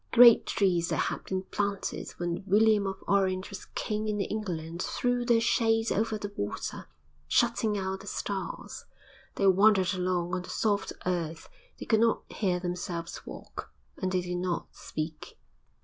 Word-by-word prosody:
Great 235 Hz, -1 st, +8 dB
trees 175 Hz, -5 st, +2 dB
that -, -, +1 dB
had -, -, -1 dB
been 190 Hz, 0 st, -2 dB
planted 200 Hz, 0 st, -2 dB
when 175 Hz, +1 st, -2 dB
William 210 Hz, 0 st, +4 dB
of 195 Hz, 0 st, -5 dB
Orange 190 Hz, -1 st, +1 dB
was 195 Hz, -, -7 dB
king 215 Hz, 0 st, -2 dB
in 210 Hz, -1 st, -1 dB
England 175 Hz, -5 st, -3 dB
threw 245 Hz, +3 st, 0 dB
their 235 Hz, -1 st, +4 dB
shade 225 Hz, -1 st, +2 dB
over 220 Hz, +1 st, +1 dB
the 205 Hz, -1 st, -6 dB
water, 100 Hz, -, -4 dB, 0.4 s
shutting 225 Hz, -, +2 dB
out 190 Hz, 0 st, -2 dB
the 195 Hz, -, -12 dB
stars. 200 Hz, -1 st, -4 dB, 0.5 s
They 200 Hz, -, +1 dB
wandered 195 Hz, 0 st, +5 dB
along 180 Hz, -1 st, -1 dB
on 185 Hz, -, 0 dB
the 180 Hz, -, -11 dB
soft 205 Hz, -2 st, 0 dB
earth, 165 Hz, -3 st, -2 dB, 0.3 s
they -, -, -6 dB
could 220 Hz, -, +3 dB
not 230 Hz, 0 st, +3 dB
hear 185 Hz, -4 st, 0 dB
themselves 175 Hz, -1 st, -4 dB
walk -, -, -8 dB, 0.2 s
and 185 Hz, -1 st, -2 dB
they 185 Hz, -1 st, +1 dB
did 180 Hz, 0 st, -3 dB
not 180 Hz, -1 st, -2 dB
speak. 155 Hz, 0 st, -6 dB
195 Hz, 160 wpm, -29 LUFS, 180-215 Hz, 0.5 s, Great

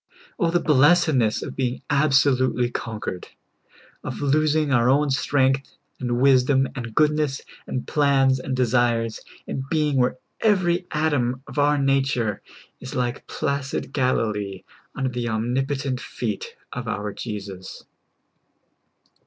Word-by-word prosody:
Oh, 170 Hz, -4 st, +2 dB
the 175 Hz, +1 st, +2 dB
blessedness 145 Hz, -6 st, +3 dB
of -, -, -7 dB
being 125 Hz, -1 st, -2 dB
absolutely 135 Hz, -4 st, +2 dB
conquered! 110 Hz, -7 st, -5 dB, 0.8 s
of -, -, -5 dB
losing 150 Hz, +1 st, +2 dB
our 120 Hz, -1 st, +4 dB
own 145 Hz, +1 st, +3 dB
strength, 135 Hz, 0 st, +1 dB, 0.2 s
and 120 Hz, -2 st, -1 dB
wisdom, 135 Hz, 0 st, +4 dB
and 115 Hz, -4 st, -6 dB
goodness, 150 Hz, -2 st, +2 dB, 0.3 s
and 125 Hz, -, -3 dB
plans, 135 Hz, -3 st, +3 dB
and 130 Hz, 0 st, -3 dB
desires, 120 Hz, -2 st, +1 dB, 0.3 s
and 135 Hz, 0 st, -5 dB
being 150 Hz, -3 st, +1 dB
where 125 Hz, 0 st, +2 dB, 0.2 s
every 180 Hz, -4 st, +2 dB
atom 135 Hz, -5 st, 0 dB
of -, -, -5 dB
our 145 Hz, +1 st, +3 dB
nature 135 Hz, -6 st, +1 dB, 0.4 s
is 125 Hz, -, -8 dB
like 125 Hz, +1 st, -2 dB
placid 140 Hz, 0 st, -3 dB
Galilee 105 Hz, -7 st, -1 dB, 0.3 s
under 135 Hz, -1 st, -1 dB
the 120 Hz, -1 st, -3 dB
omnipotent 130 Hz, +4 st, -1 dB
feet 470 Hz, 0 st, -5 dB, 0.2 s
of 125 Hz, -2 st, -5 dB
our 105 Hz, -1 st, -3 dB
Jesus. 100 Hz, -4 st, -7 dB
135 Hz, 120 wpm, -23 LUFS, 120-145 Hz, 0.8 s, our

